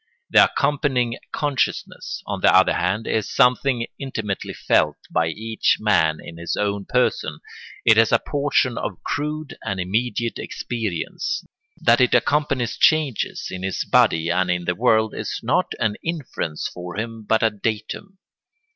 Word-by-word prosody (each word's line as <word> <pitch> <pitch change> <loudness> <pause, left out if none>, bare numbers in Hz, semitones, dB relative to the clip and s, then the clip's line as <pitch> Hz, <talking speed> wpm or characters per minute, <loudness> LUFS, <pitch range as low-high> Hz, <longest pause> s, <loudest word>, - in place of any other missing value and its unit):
The - - +8
accompanying 130 -5 0
consciousness, 145 -3 -2
on - - -4
the - - +5
other - - +5
hand, 110 +2 -1
is 110 -2 -1
something 125 -2 +2
intimately 110 -7 -4
felt 75 -1 +1
by 80 - +1
each 110 +7 0
man 80 -7 +2
in 85 - -10
his 85 0 -3
own 100 -1 -1
person; 125 0 0 0.5
it 115 -1 +6
is 115 - +4
a - - +6
portion 140 -4 0
of 95 - -5
crude 150 0 -3
and 100 -1 -3
immediate 115 +5 -1
experience. 110 -9 -3 0.3
That 115 +2 +4
it 125 - +4
accompanies 140 -5 +1
changes 150 -7 +1
in 90 - -6
his 95 0 -2
body 80 0 +3
and 90 +1 +1
in 90 -1 -1
the 90 - +1
world 110 0 +2
is - - -4
not - - +2
an 105 -2 0
inference 145 - -3
for 90 +1 -8
him 115 0 -4
but 110 +2 +1
a 110 - +4
datum. 110 - -4
115 Hz, 150 wpm, -22 LUFS, 95-125 Hz, 0.5 s, The